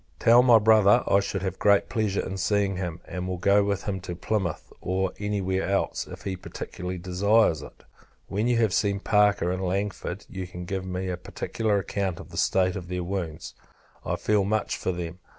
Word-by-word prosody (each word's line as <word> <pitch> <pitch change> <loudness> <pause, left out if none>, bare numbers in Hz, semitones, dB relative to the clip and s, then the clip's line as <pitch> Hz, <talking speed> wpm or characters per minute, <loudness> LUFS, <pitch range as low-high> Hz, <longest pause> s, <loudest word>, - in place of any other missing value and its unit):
Tell 120 +1 +6
my 125 -2 +7
Brother, 110 -2 +5
I 100 - +5
should 100 -1 -3
have 95 -1 -3
great 100 -1 +4
pleasure 110 -4 -1
in 95 - -4
seeing 100 0 +1
him; 90 -2 -4
and 90 +1 -5
will 90 0 -3
go 100 +3 +4
with 100 -1 -1
him 95 -2 -3
to 90 -1 -6
Plymouth, 95 -3 -3
or 95 +1 -1
any 105 -1 -1
where 95 0 0
else, 100 - -1
if - - -10
he 95 - -3
particularly 90 0 -6
desires 90 -1 +2
it. - - -13 0.4
When 105 +4 -1
you 120 -1 +2
have 110 -5 +2
seen 100 +2 +1
Parker 105 -4 +3
and 90 +1 -2
Langford, 95 0 -3
you 95 -1 -6
can 90 0 -8
give 95 0 -4
me 95 0 -3
a 90 - -2
particular 105 +4 -2
account 95 -2 -2
of - - -11
the - - -8
state 95 -1 +2
of 90 -2 -6
their 90 0 -3
wounds. 85 -3 -4 0.5
I - - -1
feel 105 -2 +1
much 110 +2 0
for - - -2
them. 85 0 -5
95 Hz, 205 wpm, -26 LUFS, 90-105 Hz, 0.5 s, my